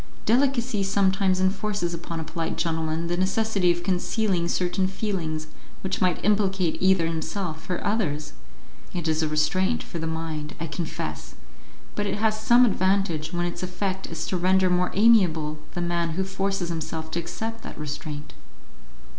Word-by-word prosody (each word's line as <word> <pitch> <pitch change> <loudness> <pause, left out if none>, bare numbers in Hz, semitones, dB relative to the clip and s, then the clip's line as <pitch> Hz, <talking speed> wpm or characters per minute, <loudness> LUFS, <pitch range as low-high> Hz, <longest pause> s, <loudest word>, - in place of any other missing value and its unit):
Delicacy 245 -2 +2
sometimes 190 -1 +2
enforces 190 -1 0
upon 170 0 -5
a - - -3
polite 165 +1 -3
gentleman 160 0 -1
the 175 +1 0
necessity 195 +1 +2
of 175 0 -2
concealing 185 -1 +1
certain 180 +2 +1
feelings 185 -6 -2 0.4
which 190 -1 -2
might 180 -3 +1
implicate 195 -4 +2
either 190 -2 +4
himself 160 +1 -3
or 180 - 0
others; 180 -9 -1 0.6
it 175 -2 -2
is 160 0 +2
a 160 - +1
restraint 185 +9 +1
for 170 - -6
the 160 - -2
mind, 160 -2 -4
I 165 - -2
confess, 165 +1 -5 0.6
but 205 0 -1
it 195 - -1
has 215 0 +1
some 240 +3 +6
advantage 185 -6 +1
when 175 0 0
its 175 0 -4
effect 185 +1 -2
is 165 -1 -4
to 185 - -1
render 185 +1 +3
more 180 0 +2
amiable 175 -9 +4 0.2
the 175 - -1
man 170 -1 0
who 190 +4 0
forces 195 -1 -1
himself 160 -1 -4
to 170 - -1
accept 225 +7 -4
that - - -8
restraint." 150 0 -5
180 Hz, 160 wpm, -25 LUFS, 165-195 Hz, 0.6 s, some